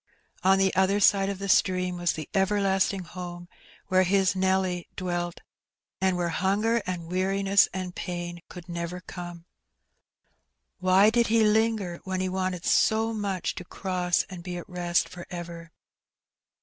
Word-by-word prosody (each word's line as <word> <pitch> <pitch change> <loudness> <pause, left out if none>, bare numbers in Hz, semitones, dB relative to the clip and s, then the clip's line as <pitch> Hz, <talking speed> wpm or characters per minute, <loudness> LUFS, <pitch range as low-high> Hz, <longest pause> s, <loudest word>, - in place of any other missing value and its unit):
On 190 +1 +5
the 190 0 +2
other 190 +2 +3
side 195 -1 +4
of 200 - -3
the 200 +1 -5
stream 185 -1 +2
was 175 -1 +1
the 155 - -6
ever 195 +1 +2
lasting 195 -1 +1
home^ 175 0 -8 0.4
where 185 -1 +3
his 190 +1 +2
Nelly 190 -2 0
dwelt^ 175 -1 -2 0.6
and 190 -1 +2
where 175 -1 0
hanger 205 +7 +1
and 180 -2 -3
weariness 195 +3 +2
and 185 -1 -5
pain 175 -1 -5
could 180 -1 -10
never 170 +1 -4
come. 175 -2 -8 1.3
Why 190 +3 +5
did 235 0 +3
he 225 0 +4
linger, 215 -4 +1
when 190 -1 -3
he 185 0 -1
wanted 185 -2 -2
so 225 +1 +3
much 200 -4 -2
to - - -7
cross 180 -1 -1
and 185 -2 -8
be 175 0 -5
at 175 - -8
rest 175 -1 0
for 175 -1 -10
ever? 170 -1 -7
185 Hz, 155 wpm, -27 LUFS, 175-195 Hz, 1.3 s, On